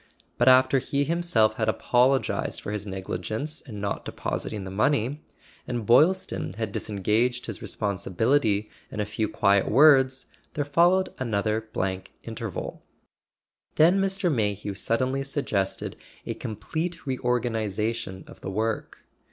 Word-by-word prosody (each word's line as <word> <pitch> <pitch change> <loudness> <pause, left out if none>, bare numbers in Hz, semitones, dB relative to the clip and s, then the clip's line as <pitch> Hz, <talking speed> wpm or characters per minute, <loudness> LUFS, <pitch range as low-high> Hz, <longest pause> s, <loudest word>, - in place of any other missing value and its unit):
But 120 - +3
after 130 +1 +6
he 140 +2 -1
himself 140 -9 +2
had - - +1
apologized 130 +2 +1
for - - -6
his 105 -1 -4
negligence 95 - -4
in 110 -7 -9
not 100 0 -3
depositing 105 -2 -4
the 95 - -7
money, 135 +6 +1 0.4
and 120 -3 -3
Boylston 165 - +3
had 110 0 -3
disengaged 110 +6 0
his 110 - -5
responsibility 105 +2 0 0.2
in - - -7
a 105 - +1
few 105 +1 -2
quiet 100 -1 +3
words, 130 0 +5 0.3
there 145 - -1
followed 175 +6 +3
another 110 -2 -1
blank 95 -2 -3
interval. - - -5 0.9
Then 175 +5 +5
Mr. 195 -3 +1
May¬ 105 -5 +1
hew 100 0 -5
suddenly 130 +7 0
suggested 135 -8 -2 0.3
a - - -2
complete 165 - -4
reorganization 115 -5 -1
of - - -15
the - - -5
work. 110 +3 -3
115 Hz, 130 wpm, -26 LUFS, 105-140 Hz, 0.9 s, after